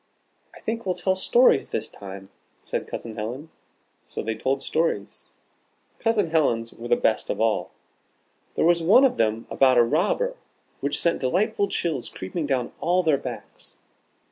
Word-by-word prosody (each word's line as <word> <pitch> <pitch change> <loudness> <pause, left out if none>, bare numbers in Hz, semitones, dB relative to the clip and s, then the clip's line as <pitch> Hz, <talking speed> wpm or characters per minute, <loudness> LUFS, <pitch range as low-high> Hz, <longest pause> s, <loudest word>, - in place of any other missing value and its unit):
"I - - -14
think 230 +1 -3
we'll 185 -2 -1
tell 185 +2 +1
stories 480 - +4
this - - -2
time," 95 0 -10 0.3
said - - -3
Cousin 115 -1 -7
Helen. 125 +9 -5 0.5
So - - -6
they 110 - -1
told 130 +5 -1
stories. 155 -11 -2 0.7
Cousin 215 -7 +1
Helen's 115 -8 +1
were 115 - -8
the 120 - +4
best 110 -2 0
of - - -2
all. 105 -5 +1 0.9
There - - +2
was 170 0 +4
one 205 +11 +6
of 265 - +1
them 110 0 0
about 130 -2 +4
a 120 - +7
robber, 210 - 0 0.4
which 140 +1 -1
sent 170 - +1
delightful 200 - +1
chills 160 -9 -2
creeping 145 - -4
down 130 -4 -1
all 180 +2 +2
their 155 -5 +3
backs. - - -8
150 Hz, 160 wpm, -24 LUFS, 115-185 Hz, 0.9 s, a